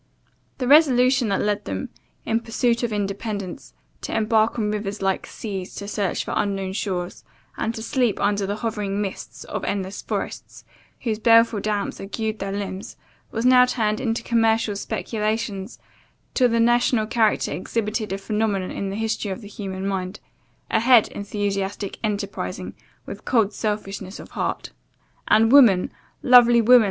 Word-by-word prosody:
The 255 - -2
resolution, 260 -4 +5
that 195 - +1
led 205 -1 -1
them, 95 0 -4 0.4
in 225 0 +1
pursuit 235 +1 0
of 240 -2 -1
independence, 200 - -4 0.3
to - - -3
embark 220 +1 +2
on 210 -2 0
rivers 210 -1 -3
like 190 0 0
seas, 195 -4 -6
to 200 - -6
search 205 -2 -2
for - - -4
unknown 195 -2 -1
shores, 185 -3 -3 0.3
and 225 - -1
to 220 - -6
sleep 245 -4 0
under 200 -1 +1
the 205 - -2
hovering 210 -3 -3
mists 200 -2 -5
of - - -5
endless 195 0 -3
forests, - - -5 0.4
whose 220 -3 -2
baleful 230 -1 +5
damps 205 0 -2
agued 215 +2 -3
their 195 0 -3
limbs, 200 -1 -5 0.3
was 225 +2 -3
now 250 0 +7
turned 215 -3 0
into 230 -1 -1
commercial 225 -2 +2
speculations, 215 0 -3 0.6
till 250 -2 +3
the 230 0 +1
national 240 -1 +3
character 220 -1 +1
exhibited 215 -1 -2
a 195 - -1
phenomenon 205 -2 -1
in 195 - -3
the 195 - -4
history 220 -1 -2
of 190 +5 -5
the 205 - -10
human 195 -2 -6
mind 190 0 -3 0.5
a - - +3
head 235 -1 +5
enthusiastically 200 -1 -3
enterprising, 205 -2 -3 0.3
with - - -8
cold 220 -4 +2
selfishness 200 -2 -4
of - - -11
heart. - - -3 0.6
And 225 +2 +4
woman, 235 -10 +6 0.3
lovely 240 -2 +7
woman! 245 +2 +7
210 Hz, 155 wpm, -23 LUFS, 200-230 Hz, 0.6 s, now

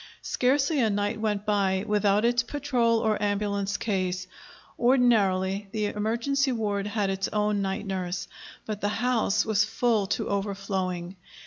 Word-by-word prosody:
Scarcely 275 +4 +1
a 225 -3 +3
night 205 +2 -1
went 210 -2 -1
by 195 -2 +1
without 210 +1 +2
its 240 0 +3
patrol 240 -3 0
or 215 -2 0
ambulance 200 -1 -1
case. 185 -3 -1 0.5
Ordinarily, 205 -6 +3
the 215 -1 0
emergency 235 +7 0
ward 205 -4 -1
had 205 -2 0
its 195 0 -1
own 210 -1 0
night 195 +2 -2
nurse. 180 -2 -3 0.4
But 215 -1 -5
the 205 - +1
house 230 -2 +1
was 210 -1 +3
full 220 -3 +1
to 205 - -1
overflowing. 195 -3 -3
205 Hz, 140 wpm, -27 LUFS, 195-230 Hz, 0.5 s, a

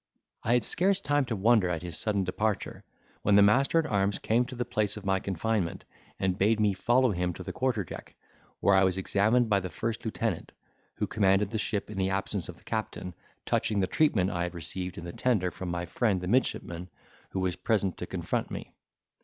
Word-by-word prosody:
I 115 - +1
had 125 - +2
scarce 190 - +3
time 145 -5 +1
to 120 -2 -2
wonder 105 -2 +4
at 85 -1 -2
his 85 -3 -4
sudden 105 -3 +1
departure, 105 +3 -2 0.4
when 105 - +3
the 100 - +8
master 135 +10 +4
at 165 - +3
arms 100 -3 +1
came 120 +3 +1
to 125 - -8
the 125 0 -2
place 105 -1 -1
of 105 - -9
my 95 0 +2
confinement, 95 0 -2 0.3
and 95 -1 0
bade 110 +3 +3
me 105 -2 +3
follow 120 +5 +3
him 90 -1 -1
to 90 - -7
the - - -6
quarter 125 -6 0
deck, 80 - -10 0.5
where 100 - +4
I 95 0 +5
was 95 -1 +2
examined 110 +5 +2
by 100 -2 +3
the 90 -1 -5
first 115 +3 -3
lieutenant, 110 -5 -3 0.4
who - - -1
commanded 100 -1 +2
the 110 - -1
ship 105 -1 -2
in 100 - -5
the 95 0 +1
absence 95 -1 -1
of 90 - -8
the - - -22
captain, 110 -5 -4 0.3
touching 105 -2 +1
the 95 - +3
treatment 100 -6 +2
I 85 - -2
had 85 0 -3
received 85 +2 -5
in - - -6
the 85 - -6
tender 105 -8 +1
from 95 - -6
my 85 0 -2
friend 100 +2 +1
the 90 - -5
midshipman, 90 -6 0 0.4
who 95 - -3
was 95 -1 0
present 100 -5 0
to - - -5
confront - - -2
me. - - -7
100 Hz, 215 wpm, -29 LUFS, 90-115 Hz, 0.5 s, the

